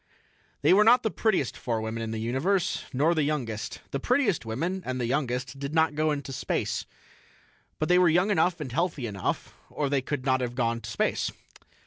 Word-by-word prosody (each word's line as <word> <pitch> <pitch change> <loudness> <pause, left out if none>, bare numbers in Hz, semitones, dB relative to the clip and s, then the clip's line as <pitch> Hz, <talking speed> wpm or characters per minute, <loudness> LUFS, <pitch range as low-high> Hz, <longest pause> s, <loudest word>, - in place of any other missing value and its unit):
They - - +6
were 205 +2 +6
not 245 +3 +6
the 220 - 0
prettiest 190 - +1
four 115 -3 -2
women 110 +1 -4
in 115 - -3
the 110 - -3
universe, 135 - 0
nor 150 +6 +2
the 160 - +1
youngest. 130 -8 -2
The 140 - -1
prettiest 220 - +1
women 170 +12 -2
and 130 -3 -3
the 120 - 0
youngest 130 0 -2
did 140 +3 -4
not 160 -1 +3
go 155 0 +1
to 140 -1 -6
space. - - -2 0.9
But 155 - -1
they 180 0 +5
were 180 -2 +5
young 180 +6 +3
enough 175 -2 +2
and 140 -5 -5
healthy 155 -3 -1
enough, 100 -4 -3 0.2
or 145 -2 -2
they 140 -2 +2
could 140 0 -4
not 130 -1 +2
have 120 -1 -3
gone 115 -2 0
to 105 - -7
space. 105 - 0
140 Hz, 200 wpm, -27 LUFS, 120-170 Hz, 0.9 s, They